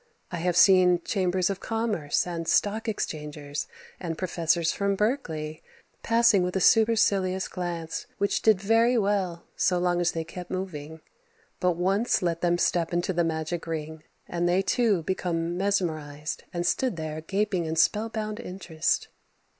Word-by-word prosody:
I 175 - -3
have 175 +1 0
seen 180 -2 +6
chambers 185 -1 0
of 195 - -5
commerce 225 -10 -1
and 170 -2 -4
stock 215 +2 +1
exchangers 150 -7 -4 0.3
and 165 -3 -4
professors 170 -2 +1
from 200 0 0
Berkeley 160 - -2 0.4
passing 230 -4 +4
with 180 +1 -2
a - - +2
supercilious 200 -4 +3
glance 170 -3 -4
which 200 0 0
did 215 -4 +4
very 225 +5 +3
well 195 -5 0
so 180 - +2
long 175 0 +1
as 175 - +1
they 165 - -2
kept 180 +2 -9
moving. 160 -4 -5 0.6
But 180 -1 +2
once 195 +6 +1
let 170 -1 -1
them 175 0 +2
step 170 -1 +1
into 175 +2 0
the 170 0 +2
magic 165 +1 -3
ring 160 -1 -5 0.3
and 175 0 0
they 185 +2 +2
too 210 -5 +2
became 170 -1 -2
mesmerized 160 -6 -2
and 175 0 -2
stood 250 +4 +1
there 155 -1 -5
gaping 195 0 -1
in 160 0 -2
spellbound 215 +5 0
interest. 180 -7 -2
180 Hz, 150 wpm, -27 LUFS, 165-200 Hz, 0.6 s, seen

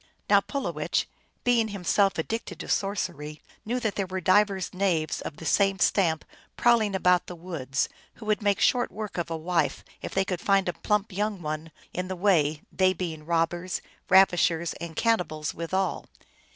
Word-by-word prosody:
Now - - +7
Pulowech, 280 -1 -2 0.4
being 240 -2 +3
himself 200 0 +1
addicted 185 0 -3
to - - -6
sorcer}^ 155 -7 -2 0.3
knew 245 +3 0
that 220 -3 0
there 195 -2 -1
were 190 +1 -3
divers 190 +1 +2
knaves 180 -5 0
of 150 - -6
the 165 - -9
same 195 +2 +3
stamp 170 -4 +2 0.3
prowling 225 -4 +3
about 180 -1 +3
the 180 - -7
woods, 160 -6 -2 0.3
who 220 - -11
wculd 215 0 +1
make 205 -2 +2
short 245 -1 +2
work 210 -1 -5
of 170 - -2
a 165 - -2
wife 170 +2 -1 0.2
if - - -5
they 195 0 +2
could 180 -3 -3
find 195 -1 +3
a 175 - 0
plump 210 0 0
young 205 -1 -2
one 155 +1 -4 0.2
in 180 +1 -3
the 185 - -3
way, 160 -6 +2
they 185 0 +3
being 160 -4 -5
robbers, 170 +2 0 0.3
ravishers, 175 -3 +4
and 170 -1 -6
canni 230 -5 +3
bals 155 -2 -5
withal. 185 +2 -2
185 Hz, 175 wpm, -27 LUFS, 165-200 Hz, 0.4 s, Now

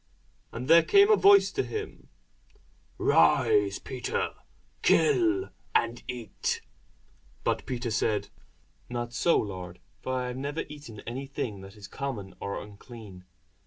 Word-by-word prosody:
And 125 +3 -6
there 165 +2 +8
came 400 - +5
a - - +8
voice 400 -1 +6
to - - 0
him, 425 -1 -6 0.9
Rise, 425 -2 +4
Peter; 465 -1 -3 0.5
kill, 380 -2 +3 0.2
and 115 +1 +1
eat. 125 -3 -3 0.8
But - - -1
Peter 120 -2 -3
said, 105 -2 0 0.6
Not 120 -1 -4
so, 170 +7 +3
Lord; 90 -3 -4 0.2
for 130 - -3
I 125 -1 -1
have 125 - -5
never 145 +4 -3
eaten 145 -8 -10
any 130 +4 -6
thing 110 -7 -4
that 95 +1 -12
is 100 -2 -10
common 105 -5 -5
or 100 - -4
unclean. 105 -2 -12
125 Hz, 130 wpm, -28 LUFS, 105-165 Hz, 0.9 s, there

